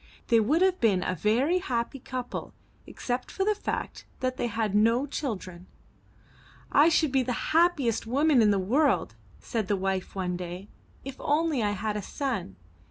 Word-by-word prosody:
They 230 Hz, -, +5 dB
would 295 Hz, -, +2 dB
have 375 Hz, -1 st, +2 dB
been 200 Hz, -6 st, +3 dB
a 185 Hz, -, -1 dB
very 250 Hz, -, +2 dB
happy 255 Hz, -5 st, -3 dB
couple 255 Hz, 0 st, -6 dB, 0.3 s
except 250 Hz, 0 st, -4 dB
for 385 Hz, -, -2 dB
the 425 Hz, -, +3 dB
fact 420 Hz, -, -5 dB
that 255 Hz, 0 st, -1 dB
they 240 Hz, -, -1 dB
had 225 Hz, -3 st, -2 dB
no 230 Hz, +5 st, +3 dB
children. 190 Hz, -, -5 dB, 1.1 s
'T 300 Hz, +3 st, +7 dB
should 315 Hz, -3 st, +2 dB
be 265 Hz, 0 st, +3 dB
the 250 Hz, +2 st, -3 dB
happiest 300 Hz, -10 st, +2 dB
woman 280 Hz, +1 st, +3 dB
in 215 Hz, -, +5 dB
the 200 Hz, -, +3 dB
world," 260 Hz, +11 st, +1 dB, 0.3 s
said 225 Hz, -5 st, -3 dB
the 205 Hz, -, +1 dB
wife 190 Hz, 0 st, -2 dB
one 180 Hz, -2 st, -2 dB
day, 180 Hz, +3 st, -7 dB, 0.4 s
''if 270 Hz, -1 st, -7 dB
only 300 Hz, -2 st, +1 dB
I 205 Hz, -1 st, +1 dB
had 210 Hz, +1 st, -3 dB
a 210 Hz, -, -2 dB
son. 220 Hz, -, -4 dB
235 Hz, 170 wpm, -27 LUFS, 205-285 Hz, 1.1 s, T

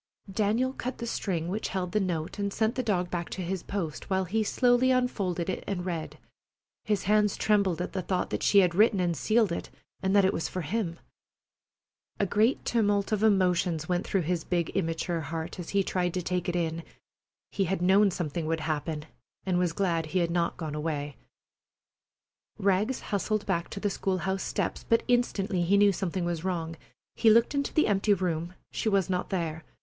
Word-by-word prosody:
Daniel 220 Hz, +6 st, +1 dB
cut 255 Hz, -1 st, -5 dB
the 235 Hz, -, -5 dB
string 180 Hz, -7 st, -2 dB
which 205 Hz, +5 st, -2 dB
held 185 Hz, -2 st, -3 dB
the 215 Hz, -, +2 dB
note 175 Hz, -1 st, -2 dB
and 200 Hz, 0 st, -1 dB
sent 220 Hz, +2 st, +1 dB
the 260 Hz, -, -1 dB
dog 180 Hz, -7 st, 0 dB
back 175 Hz, -1 st, -3 dB
to 185 Hz, -, -4 dB
his 185 Hz, +1 st, -3 dB
post, 170 Hz, -7 st, -4 dB
while 190 Hz, -1 st, +1 dB
he 215 Hz, +5 st, 0 dB
slowly 245 Hz, +3 st, +3 dB
unfolded 200 Hz, -9 st, 0 dB
it 190 Hz, -, -3 dB
and 180 Hz, -3 st, -2 dB
read, 170 Hz, -4 st, -4 dB, 0.7 s
his 210 Hz, -3 st, 0 dB
hands 210 Hz, +1 st, +3 dB
trembling 200 Hz, -5 st, +2 dB
at 180 Hz, -, -3 dB
the 190 Hz, -, -1 dB
thought 185 Hz, 0 st, -2 dB
that -, -, -2 dB
she 200 Hz, -, +6 dB
had 180 Hz, -2 st, +2 dB
written 210 Hz, +2 st, +4 dB
and 175 Hz, -2 st, +1 dB
sealed 220 Hz, -, +2 dB
it, 170 Hz, -, -4 dB, 0.3 s
and 190 Hz, +1 st, +1 dB
that 200 Hz, -2 st, +6 dB
it 190 Hz, -, +2 dB
was 165 Hz, -, -2 dB
for 185 Hz, -, -3 dB
him. 170 Hz, 0 st, -2 dB, 1.2 s
A 200 Hz, -, +3 dB
great 215 Hz, +7 st, +2 dB
tumult 205 Hz, -3 st, +1 dB
of 215 Hz, -1 st, +1 dB
emotions 180 Hz, -6 st, +2 dB
went 180 Hz, -1 st, 0 dB
through 190 Hz, -3 st, +1 dB
his 170 Hz, 0 st, -1 dB
big, 175 Hz, -2 st, -1 dB
immature 165 Hz, -1 st, -1 dB
heart 160 Hz, +3 st, -5 dB
as 175 Hz, -, -6 dB
he 200 Hz, -1 st, +2 dB
tried 180 Hz, -2 st, -1 dB
to 180 Hz, -, -1 dB
take 180 Hz, 0 st, -1 dB
it 175 Hz, -, -2 dB
in. 165 Hz, -1 st, -1 dB, 0.7 s
He 195 Hz, -, 0 dB
had 190 Hz, +1 st, -1 dB
known 195 Hz, +3 st, +5 dB
something 165 Hz, -3 st, -3 dB
would 160 Hz, 0 st, -1 dB
happen, 155 Hz, 0 st, -2 dB, 0.4 s
and 180 Hz, -2 st, +1 dB
was 180 Hz, -2 st, +1 dB
glad 165 Hz, -3 st, 0 dB
he 175 Hz, -, -2 dB
had 170 Hz, -, -5 dB
not 170 Hz, -1 st, 0 dB
gone 160 Hz, -3 st, -4 dB
away. 150 Hz, -2 st, -3 dB, 1.4 s
Rags 200 Hz, +6 st, +1 dB
hustled 210 Hz, +1 st, -1 dB
back 170 Hz, -3 st, -1 dB
to -, -, -6 dB
the 205 Hz, -, 0 dB
school 190 Hz, -1 st, -1 dB
house 190 Hz, +1 st, -2 dB
steps, -, -, -2 dB
but 230 Hz, 0 st, +2 dB
instantly 215 Hz, -6 st, +1 dB
he 185 Hz, +4 st, +3 dB
knew 205 Hz, 0 st, +6 dB
something 185 Hz, -1 st, -2 dB
was 170 Hz, -2 st, -2 dB
wrong. 165 Hz, -3 st, -2 dB, 0.4 s
He 225 Hz, -, +4 dB
looked 230 Hz, +4 st, +5 dB
into 280 Hz, 0 st, -1 dB
the 310 Hz, -, +3 dB
empty 205 Hz, 0 st, +3 dB
room. 175 Hz, -1 st, -2 dB, 0.2 s
She 220 Hz, -, -1 dB
was 195 Hz, -3 st, +2 dB
not 180 Hz, -1 st, -2 dB
there. 165 Hz, -4 st, -2 dB
185 Hz, 200 wpm, -28 LUFS, 170-205 Hz, 1.4 s, she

